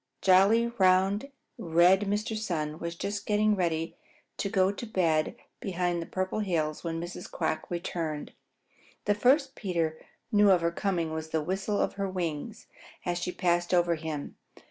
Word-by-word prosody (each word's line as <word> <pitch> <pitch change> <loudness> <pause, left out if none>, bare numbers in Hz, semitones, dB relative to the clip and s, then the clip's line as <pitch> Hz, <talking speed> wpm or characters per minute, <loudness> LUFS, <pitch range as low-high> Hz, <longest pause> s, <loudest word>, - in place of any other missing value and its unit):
Jolly, 195 +5 +5
round, 190 +6 +3 0.3
red 180 +4 +4
Mr. 210 +2 -1
Sun 160 -8 -3
was 170 0 -4
just 205 +3 -4
getting 210 0 +3
ready 165 -3 -1 0.4
to 200 - -1
go 190 0 +3
to 205 - -6
bed 165 -7 +1 0.2
behind 175 -2 -1
the 165 - -6
Purple 185 +2 -2
Hills 160 -7 -1
when 165 -1 -2
Mrs. 175 +2 -7
Quack 160 -1 -2
returned. 165 -3 -3 0.7
The 205 - +3
first 265 +6 +3
Peter 165 - -2 0.3
knew 205 -1 +5
of 185 -3 +5
her 170 0 +1
coming 170 -3 -1
was 160 0 -4
the 160 -1 0
whistle 195 +4 -1
of - - +1
her 195 - 0
wings 180 +3 -4 0.4
as 175 -1 -1
she 180 - -2
passed 175 0 +1
over 175 -1 +3
him. 155 -3 -5
180 Hz, 160 wpm, -29 LUFS, 165-200 Hz, 0.7 s, Jolly